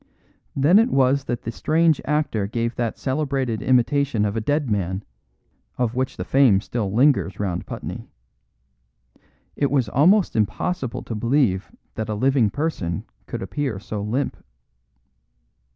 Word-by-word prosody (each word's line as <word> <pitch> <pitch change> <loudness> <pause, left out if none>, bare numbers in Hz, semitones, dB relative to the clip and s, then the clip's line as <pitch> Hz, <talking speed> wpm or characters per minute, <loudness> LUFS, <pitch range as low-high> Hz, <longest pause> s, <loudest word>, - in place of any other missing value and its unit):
Then 150 +9 +5
it 230 +3 +3
was 135 - +2
that 120 -1 -3
the 115 - -3
strange 160 +5 +2
actor 150 -9 0
gave 115 +2 -2
that 115 -2 -2
celebrated 135 -5 -1
imitation 130 -2 +2
of 105 0 -2
a 115 - -1
dead 145 +5 0
man, 95 -2 -1 0.7
of 120 -2 0
which 130 +1 -2
the - - -4
fame 130 -8 +4
still 105 -1 -3
lingers 110 -5 +2
round 90 -4 -2
Putney. - - -7 1.5
It 140 - +1
was 130 -6 +1
almost 175 - +3
impossible 115 - -1
to - - -6
believe 115 -4 +1 0.2
that 110 0 -4
a 105 - -1
living 130 -1 +2
person 100 - -2 0.2
could - - -5
appear 120 +3 -3
so 105 +1 -5
limp. 120 +7 -2
125 Hz, 140 wpm, -23 LUFS, 105-140 Hz, 1.5 s, Then